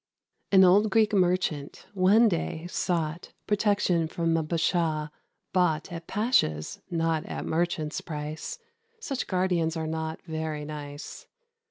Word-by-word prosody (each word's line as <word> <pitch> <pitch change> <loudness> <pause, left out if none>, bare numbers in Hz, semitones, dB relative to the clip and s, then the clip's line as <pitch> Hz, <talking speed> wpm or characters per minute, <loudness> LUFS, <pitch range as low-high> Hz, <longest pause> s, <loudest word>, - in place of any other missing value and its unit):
An 190 -1 +7
old 200 +4 +5
Greek 215 0 +3
Merchant, 180 -6 0
one 205 +5 +5
day, 170 -3 -2
sought 170 -2 -2
Protection 205 -5 +2
from 165 0 0
a 165 - +2
Bashaw, 160 -1 0 0.4
bought 175 -4 +1
At 165 -1 -7
pasha's, 205 - +1
not 165 -2 0
at - - -5
merchant's, 165 0 -1
price 155 - -5 0.4
(Such 280 - -3
guardians 180 -3 +1
are 160 - -2
not 160 0 -3
very 160 -3 -4
nice). 145 0 -8
165 Hz, 125 wpm, -27 LUFS, 155-185 Hz, 0.4 s, An